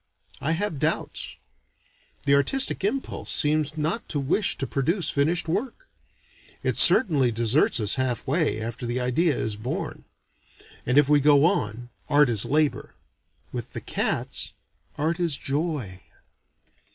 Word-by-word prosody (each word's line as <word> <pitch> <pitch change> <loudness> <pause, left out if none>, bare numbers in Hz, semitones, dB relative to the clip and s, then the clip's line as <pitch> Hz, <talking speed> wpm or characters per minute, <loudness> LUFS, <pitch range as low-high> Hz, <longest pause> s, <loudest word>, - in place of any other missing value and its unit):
I 155 +4 0
have 170 -4 -3
doubts. - - -3 0.9
The 140 - +3
artistic 225 - +2
impulse 260 +7 -3
seems 150 0 +1
not 160 +10 -2
to 145 - -1
wish 140 +9 0
to 135 - -3
produce 160 +6 -1
finished 160 +5 +1
work. 255 - -4 0.8
It - - 0
certainly 145 - +6
deserts 115 +6 +2
us 105 +3 +1
half 125 -2 -2
way, 150 -4 0
after 115 +2 -5
the 120 +2 -2
idea 135 +5 +1
is 110 -1 -2
born; 115 +4 -5 0.8
and 125 +3 +1
if 145 -2 +5
we 145 0 +4
go 145 +1 +4
on, 120 - -1 0.2
art 145 -2 +4
is 110 -4 +1
labor. 150 +1 -1 0.6
With - - -7
the - - -4
cats, - - -1 0.4
art 165 +4 -1
is 165 -6 0
joy. 140 - -3
145 Hz, 140 wpm, -24 LUFS, 125-165 Hz, 0.9 s, certainly